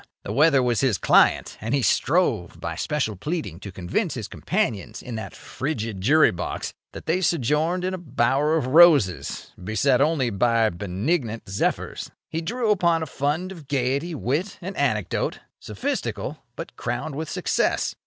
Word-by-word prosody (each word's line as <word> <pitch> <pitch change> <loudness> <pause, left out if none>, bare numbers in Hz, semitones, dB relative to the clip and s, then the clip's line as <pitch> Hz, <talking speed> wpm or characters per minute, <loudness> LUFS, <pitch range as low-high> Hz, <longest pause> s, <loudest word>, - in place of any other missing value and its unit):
The 100 - -4
weather 140 0 +4
was 120 -3 +1
his 130 -8 +2
client, - - +3
and 115 +5 0
he 135 - 0
strove 125 - +1
by - - -4
special 130 -8 -1
pleading 150 - -4
to 100 0 -8
convince 90 -1 -2
his - - -5
companions 100 -3 -2
in 125 - -7
that 110 -1 -6
frigid 115 -9 -4
jury 150 +10 +5
box 90 0 -4 0.2
that - - -9
they 180 +3 +1
sojourned 165 +3 +1
in 185 +1 -1
a 185 - -4
bower 140 +1 +1
of 150 - -1
roses, 140 - +4
beset 125 +6 +2
only 140 -5 +2
by 115 +2 +2
benignant 105 - -2
zephyrs. 95 +1 -2 0.2
He 165 - -2
drew 225 +5 0
upon 170 -5 +2
a - - -2
fund 150 +6 -2
of 165 -7 -11
gaiety, 140 +5 -1
wit, 150 - -2
and 190 +2 -6
anecdote, 110 -9 0 0.2
sophistical, - - -3 0.2
but - - -8
crowned 155 - -3
with 155 +2 -4
success. - - 0
140 Hz, 160 wpm, -24 LUFS, 110-160 Hz, 0.2 s, jury